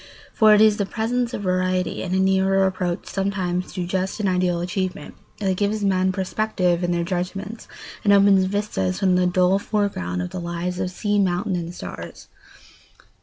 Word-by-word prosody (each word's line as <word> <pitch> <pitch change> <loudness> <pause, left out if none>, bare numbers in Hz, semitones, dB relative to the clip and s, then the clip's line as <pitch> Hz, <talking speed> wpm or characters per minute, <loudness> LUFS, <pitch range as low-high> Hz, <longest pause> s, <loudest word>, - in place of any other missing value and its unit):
For 215 -1 +6
it 210 - +4
is 215 -1 +5
the 200 - -1
presence 235 +3 -1
of 205 - -5
variety 185 0 0
and 185 0 -2
a - - +2
nearer 190 0 +3
approach 185 -2 -2
somewhere 190 -2 -1
to 185 -1 -5
just 190 +3 -2
and 210 - 0
ideal 180 -1 +1
achievement 185 +1 -3 0.2
that 190 -3 0
gives 205 +2 -1
men 190 -1 +2
perspective 185 -2 0
in 175 - 0
their 170 -1 0
judgments 190 +5 -4 0.4
and 205 - +4
opens 200 -1 +5
vistas 185 - -1
from 185 -2 +2
the 180 0 +3
dull 185 +2 +3
foreground 145 - -2
of 90 - -6
their 180 - -5
lives 170 +1 -3
to 185 - -2
sea, 205 +2 -1
mountain, 185 0 0
and 175 0 -5
stars. - - -9
185 Hz, 175 wpm, -22 LUFS, 180-200 Hz, 0.4 s, For